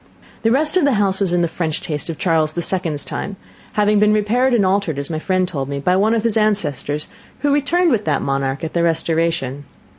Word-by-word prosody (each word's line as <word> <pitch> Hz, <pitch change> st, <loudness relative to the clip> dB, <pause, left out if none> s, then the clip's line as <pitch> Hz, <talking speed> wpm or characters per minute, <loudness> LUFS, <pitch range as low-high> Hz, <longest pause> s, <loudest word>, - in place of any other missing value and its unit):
The 225 Hz, -, +2 dB
rest 300 Hz, +8 st, +2 dB
of 360 Hz, -, +3 dB
the 280 Hz, -1 st, +3 dB
house 200 Hz, -3 st, +1 dB
was 195 Hz, -3 st, 0 dB
in 175 Hz, 0 st, +2 dB
the -, -, +2 dB
French 160 Hz, -2 st, -2 dB
taste 150 Hz, 0 st, -4 dB
of 165 Hz, -, -4 dB
Charles 160 Hz, -3 st, +1 dB
the 170 Hz, -, -2 dB
Second's 165 Hz, -6 st, -1 dB
time, 200 Hz, -, -5 dB, 0.4 s
having 210 Hz, 0 st, +3 dB
been 210 Hz, 0 st, +4 dB
repaired 230 Hz, +5 st, +2 dB
and 225 Hz, -5 st, +3 dB
altered, 185 Hz, -5 st, 0 dB
as 140 Hz, +3 st, -4 dB
my 155 Hz, -, -2 dB
friend 185 Hz, +2 st, 0 dB
told 140 Hz, -6 st, -4 dB
me, 140 Hz, 0 st, -3 dB
by 180 Hz, +6 st, +1 dB
one 215 Hz, +4 st, +2 dB
of 220 Hz, -, 0 dB
his 230 Hz, -2 st, +1 dB
ancestors, 150 Hz, -9 st, 0 dB, 0.3 s
who 290 Hz, -1 st, +2 dB
returned 330 Hz, +4 st, +2 dB
with 215 Hz, -4 st, 0 dB
that 150 Hz, -2 st, 0 dB
monarch 135 Hz, +1 st, -2 dB
at 160 Hz, -, -4 dB
the 170 Hz, -, +1 dB
Restoration. 165 Hz, -4 st, 0 dB
180 Hz, 230 wpm, -19 LUFS, 155-215 Hz, 0.4 s, been